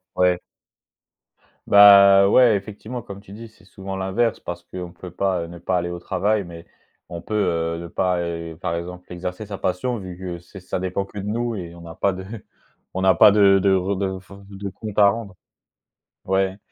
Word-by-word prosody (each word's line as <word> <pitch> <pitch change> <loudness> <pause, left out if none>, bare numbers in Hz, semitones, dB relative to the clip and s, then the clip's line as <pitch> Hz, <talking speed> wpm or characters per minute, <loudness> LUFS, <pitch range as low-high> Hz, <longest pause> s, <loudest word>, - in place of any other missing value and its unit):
Ouais. 90 -1 +3 1.3
Bah. 100 -1 +8
Ouais, 120 0 +5
effectivement 110 +4 -7
comme 100 -3 -10
tu 100 -1 -15
dis: 115 +3 -9
«C'est 110 - -23
souvent 95 0 -8
l'inverse» 95 +5 -1
parce 85 0 -7
qu'on 90 -1 -8
peut 90 +1 -10
pas 90 -2 -1
ne 85 +1 -10
pas 90 +2 -1
aller 85 0 -3
au 85 - -5
travail, 105 +4 0
mais 85 -1 -11 0.4
on 85 - -7
peut, 110 - -6
heu, 85 -5 0
ne 85 - -7
pas, 90 +1 0
heu, 85 -1 -5
par 85 -3 -2
exemple, 90 +1 -6
exercer 90 +4 -6
sa 100 -1 -7
passion 105 +7 -2
vu 95 -3 -8
que 90 -2 -6
c'est 90 +3 -13
ça 90 - -4
dépend 95 +1 -2
que 100 +1 -11
de 100 - -5
nous 115 +2 -2
et 85 -4 -7
on 85 - -12
n'a 85 -1 -10
pas 100 +3 +1
de 95 0 -7 0.7
on 95 - -2
n'a 95 -1 +5
pas 95 - +7
de 100 -1 +5
de 95 0 +3
re 95 +2 -1
de 95 -1 -2
f 95 - -17 0.2
de 100 0 -6
compte 105 +2 -8
à 100 -1 +7
rendre. 100 -1 -3 0.9
Ouais 95 0 0
95 Hz, 205 wpm, -22 LUFS, 90-100 Hz, 1.3 s, Bah